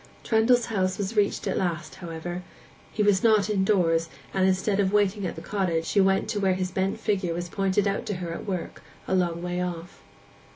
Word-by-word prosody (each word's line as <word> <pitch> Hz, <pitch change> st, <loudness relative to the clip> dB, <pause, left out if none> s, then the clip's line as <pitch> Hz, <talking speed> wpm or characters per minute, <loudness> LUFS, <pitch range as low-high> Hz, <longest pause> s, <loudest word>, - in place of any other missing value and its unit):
Trendle's 235 Hz, +2 st, +3 dB
house 190 Hz, -4 st, -1 dB
was 205 Hz, +2 st, -3 dB
reached 205 Hz, -1 st, +1 dB
at -, -, 0 dB
last, 170 Hz, -4 st, -2 dB
however: 175 Hz, +1 st, -5 dB, 0.5 s
he 210 Hz, -, 0 dB
was 200 Hz, -2 st, +3 dB
not 215 Hz, -2 st, +4 dB
indoors, 180 Hz, -5 st, +2 dB, 0.2 s
and 190 Hz, -1 st, +3 dB
instead 190 Hz, +2 st, +1 dB
of 195 Hz, -1 st, +2 dB
waiting 205 Hz, -1 st, +2 dB
at -, -, -5 dB
the -, -, -9 dB
cottage, 180 Hz, -5 st, -1 dB
she 200 Hz, -, +2 dB
went 195 Hz, 0 st, +2 dB
to 215 Hz, -2 st, -1 dB
where 190 Hz, -2 st, +2 dB
his 185 Hz, 0 st, -2 dB
bent 190 Hz, +1 st, -1 dB
figure 190 Hz, -5 st, -1 dB
was 175 Hz, 0 st, -4 dB
pointed 195 Hz, +2 st, +1 dB
out 195 Hz, -, -2 dB
to 205 Hz, -, -2 dB
her 175 Hz, -2 st, -4 dB
at 170 Hz, -, -7 dB
work 185 Hz, -4 st, -4 dB, 0.3 s
a -, -, -1 dB
long 175 Hz, -2 st, 0 dB
way 180 Hz, 0 st, -2 dB
off. 180 Hz, 0 st, -5 dB
190 Hz, 205 wpm, -26 LUFS, 175-205 Hz, 0.5 s, not